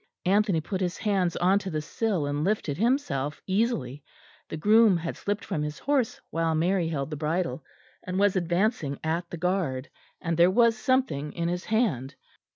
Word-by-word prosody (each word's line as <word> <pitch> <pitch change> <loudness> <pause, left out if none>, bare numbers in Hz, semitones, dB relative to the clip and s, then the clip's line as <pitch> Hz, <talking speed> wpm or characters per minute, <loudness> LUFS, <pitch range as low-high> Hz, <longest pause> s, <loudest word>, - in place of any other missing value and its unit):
Anthony 195 -3 +3
put 190 +4 -4
his 175 -3 -1
hands 190 -5 0
on 185 +3 +3
to 195 - -5
the 155 -3 -2
sill 185 +1 -1
and 145 +1 -1
lifted 185 -6 0
himself 155 - 0
easily. 185 - -1 0.5
The - - -4
groom 210 +2 +5
had 165 0 -4
slipped 205 0 -3
from 150 - -2
his 150 0 -4
horse 275 -5 0
while 165 -1 0
Mary 175 +2 +1
held 145 -2 -3
the - - -2
bridle, 160 +1 -2 0.4
and 185 0 -4
was 200 0 +3
advancing 175 - 0
at 170 +2 -2
the 170 - -6
guard, 165 -6 -1 0.3
and 165 -2 -2
there 170 +1 +6
was 230 +3 +4
something 220 - 0
in 170 0 -1
his 180 +1 -3
hand. 160 - 0
175 Hz, 175 wpm, -27 LUFS, 155-205 Hz, 0.5 s, there